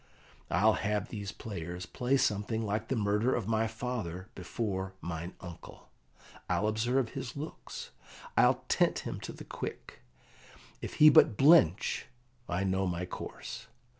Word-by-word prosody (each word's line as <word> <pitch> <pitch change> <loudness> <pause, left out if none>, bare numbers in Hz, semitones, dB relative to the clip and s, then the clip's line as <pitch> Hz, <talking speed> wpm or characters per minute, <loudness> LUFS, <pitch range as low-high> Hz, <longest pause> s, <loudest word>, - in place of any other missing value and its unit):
I'll 105 +4 +4
have 105 0 -1
these 100 -2 -5
players 90 -5 -6
play 125 +8 +1
something 110 -2 0
like 105 +2 -1
the 135 - 0
murder 105 +3 +2
of 115 -5 -2
my 110 0 +2
father 110 -6 -4
before 95 0 -3
mine 85 +1 -5
uncle; 90 -2 -11 0.6
I'll 105 - +2
observe 120 +3 +1
his 125 +4 -6
looks; 155 +3 -7 0.4
I'll - - +4
tent - - +2
him - - -4
to - - -6
the - - -10
quick; - - -7 0.8
if - - -5
he 155 - +9
but 115 -7 +6
blench, 135 - +5 0.4
I 90 +2 0
know 95 0 +1
my 90 0 -2
course. - - -7
105 Hz, 140 wpm, -31 LUFS, 95-115 Hz, 0.8 s, he